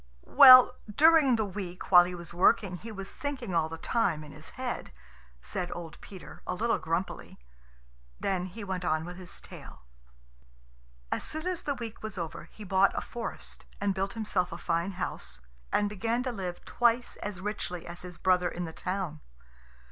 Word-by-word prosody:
"Well, 255 -3 +10 0.2
during 310 -4 +6
the 220 -1 0
week, 185 -2 -7
while 175 -1 +9
he 180 0 -5
was 170 -1 -7
working, 185 +1 +3
he 225 +5 -9
was 195 -2 -7
thinking 270 -9 -4
all 160 -2 +2
the 165 - -6
time, 165 -7 0
in 150 - -11
his 155 +2 -9
head," 255 -1 -4 0.5
said 180 -1 -3
old 165 -3 -8
Peter, 190 -3 -11
a - - -1
little 230 +5 +1
grumpily. 165 +4 -3 0.8
Then 185 -2 -1
he 210 +4 -8
went 190 -2 -3
on 155 -2 0
with 175 0 -8
his 180 -1 -8
tale. 60 - -12 1.3
As - - -1
soon 315 +2 -5
as 365 -2 -1
the 285 - -2
week 230 -3 -7
was 215 -2 -6
over, 165 -2 -5
he 210 - -12
bought 190 0 +3
a - - -1
forest 235 -1 -6
and 200 -1 +1
built 195 +1 -2
himself 195 -5 -1
a - - -5
fine 170 +3 -1
house, 65 - -5 0.3
and 205 - +2
began 225 +4 -1
to 255 - -2
live 185 -6 -5
twice 240 0 +1
as 205 -3 -5
richly 185 -3 -4
as 170 +1 -8
his 180 -1 -9
brother 180 -1 +2
in 175 0 -4
the 160 - -7
town. 180 -4 -4
190 Hz, 180 wpm, -29 LUFS, 175-230 Hz, 1.3 s, Well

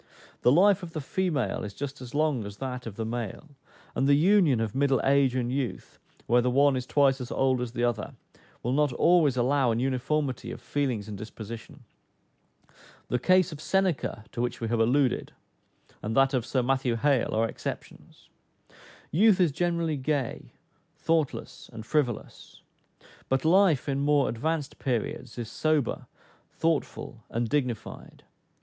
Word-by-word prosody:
The 125 - +5
life 195 +6 +5
of 170 -2 -8
the 160 - -3
female 155 -1 -1
is 100 -1 -7
just 140 0 -6
as 125 +1 -9
long 150 -6 +1
as 100 0 -8
that 125 -2 -5
of 105 - -7
the 110 - -3
male; 120 +5 -5 0.4
and 135 - +1
the 140 - +6
union 165 - +4
of 110 -2 -2
middle 135 -1 +2
age 135 -2 +3
and 125 -1 -1
youth, 130 -2 -4 0.3
where 120 +1 +4
the 125 - +1
one 140 +2 +4
is 125 -1 -3
twice 135 -2 +3
as 125 - -6
old 130 -2 +1
as 120 -1 -4
the 120 - -2
other, 120 -3 -1 0.5
will 125 - -1
not 145 +1 +2
always 155 -4 +3
allow 130 +1 +2
an 115 0 0
uniformity 135 +2 -1
of - - -7
feelings 120 -3 -2
and 105 -2 -7
disposition. 110 +1 -9 1.3
The 125 - 0
case 185 +5 +3
of 155 -1 -8
Seneca 185 - 0
(to 120 - -4
which 120 - -2
we 115 - -3
have 115 0 0
alluded,) 125 +3 +1 0.7
and 110 +4 -3
that 135 +1 +4
of 125 -3 0
Sir 130 -2 0
Matthew 130 -1 +1
Hale, 130 -1 +1
are 115 +1 +2
exceptions. - - -8 0.8
Youth 200 +4 +4
is 175 -5 +4
generally 170 0 -1
gay, 135 -2 -3 0.4
thoughtless, 160 -4 -2
and 110 -2 -9
frivolous; 125 -2 -3 0.7
but 135 +2 0
life, 175 -4 +4
in 140 -1 0
more 145 0 +2
advanced 150 +4 -3
periods, 125 -1 -3
is 115 -2 -5
sober, 155 -5 0 0.5
thoughtful, 160 -7 -2
and 115 +1 -1
dignified. 125 -5 -3
135 Hz, 160 wpm, -27 LUFS, 120-150 Hz, 1.3 s, the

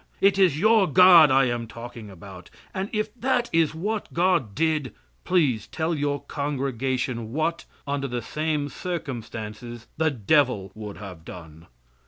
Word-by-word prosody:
It 195 0 +3
is 175 -6 +4
your 220 0 +4
God 175 -1 +8
I 135 0 +4
am 120 -2 -2
talking 115 -1 -9
about, 95 -1 -12 0.2
and 195 +1 -3
if 215 0 -2
that 245 0 -1
is 165 -2 +2
what 210 +6 -3
God 170 - +1
did, 155 -5 0 0.3
please 145 - +1
tell 160 +1 -2
your 145 -2 -1
congregation 130 -4 -3
what, 160 +3 -1 0.2
under 140 -1 -2
the 120 -2 -4
same 150 +1 -2
circumstances, 120 - -6
the 160 0 +2
devil 125 -5 +1
would 105 -2 -8
have 90 -5 -10
done. 80 -1 -12
140 Hz, 145 wpm, -25 LUFS, 115-165 Hz, 0.3 s, God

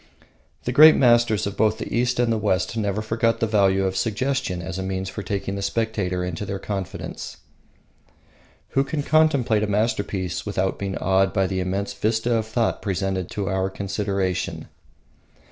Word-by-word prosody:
The 125 - -2
great 155 +4 +8
masters 120 -4 +3
both 105 +2 +1
of - - -4
the - - -4
East 120 +1 +1
and 120 -2 +2
the - - 0
West 95 0 0
never 105 -1 -1
forgot 115 +1 0
the - - +2
value 95 -3 +2
of 95 0 -1
suggestion 120 -2 -1
as 90 +1 -5
a - - -2
means 95 0 -3
for 100 - -6
taking 100 -1 -3
the 100 - -4
spectator 100 -4 -1
into 90 +2 -4
their 100 -1 -3
confidence. 95 -2 -6 1.3
Who 135 - +2
can 145 +1 -3
contemplate 140 -9 +3
a 105 - 0
masterpiece 100 -3 -1
without 95 -2 -1
being 100 -1 -3
awed 95 -1 +2
by 95 -2 +2
the 95 0 -2
immense 95 +2 -2
vista 110 +2 0
of 110 -1 -1
thought 115 +1 0
presented 95 -2 -2
to 100 -2 -3
our 95 0 0
consideration? 95 -1 -2
100 Hz, 170 wpm, -23 LUFS, 95-115 Hz, 1.3 s, great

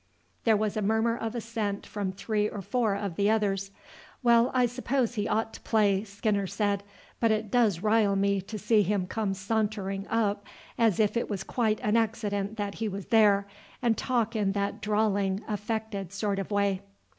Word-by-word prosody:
There 220 -2 +5
was 210 -1 -1
a 215 - 0
murmur 220 +3 +2
of 225 0 -4
assent 220 -3 -3
from 200 -3 -3
three 210 +2 -1
or 200 - -6
four 225 -2 +1
of 200 -4 -4
the 200 +1 +3
others. 200 -3 +1 0.5
"Well, 235 0 +5
I 255 -1 +3
suppose 245 0 -1
he 210 -3 -1
ought 225 0 0
to - - -10
play," 205 -3 +2
Skinner 200 -1 -1
said; 205 0 0 0.4
"but 230 - +3
it 215 -1 0
does 215 -8 +3
rile 215 -2 +3
me 200 0 +2
to 210 +3 -7
see 210 +1 +3
him 200 -1 0
come 200 0 -2
sauntering 195 -1 -2
up 210 -2 0 0.3
as 225 -5 +2
if 210 0 +2
it 235 - -1
was 195 -3 -3
quite 220 -2 0
an 210 +2 +2
accident 210 -2 -1
that 205 -1 -2
he 225 - +1
was 200 -1 -5
there, 210 -3 +5 0.3
and 235 -3 +2
talk 235 -2 0
in 200 -3 +1
that 200 0 -2
drawling, 205 -2 +1
affected 210 -3 -3
sort 200 0 -1
of 195 - -4
way." 200 -2 +1
210 Hz, 185 wpm, -28 LUFS, 200-225 Hz, 0.5 s, There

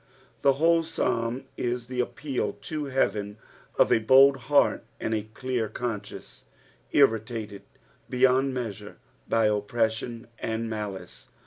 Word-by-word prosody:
The 140 - +5
oMe 165 +4 +3
Psmm 120 -5 -1
is 120 0 -2
the 125 0 -5
appeal 130 +2 -2
to 155 -2 -5
heaven 105 -6 -1 0.4
of - - +4
a - - +5
bold 135 +5 +6
heart 145 -1 +3 0.2
aj\d 110 -1 -1
a 110 +3 -14
dear 125 -4 -1
eon 120 -4 -1
idence, 105 - -12 0.5
irritated 110 -2 +1 0.5
beyond 130 +1 +3
TTteasare 115 -6 -5
In/ - - -29 0.3
opprtstion 110 +2 0
and 115 +1 -2
malice. 105 -5 -6
115 Hz, 125 wpm, -27 LUFS, 110-130 Hz, 0.5 s, bold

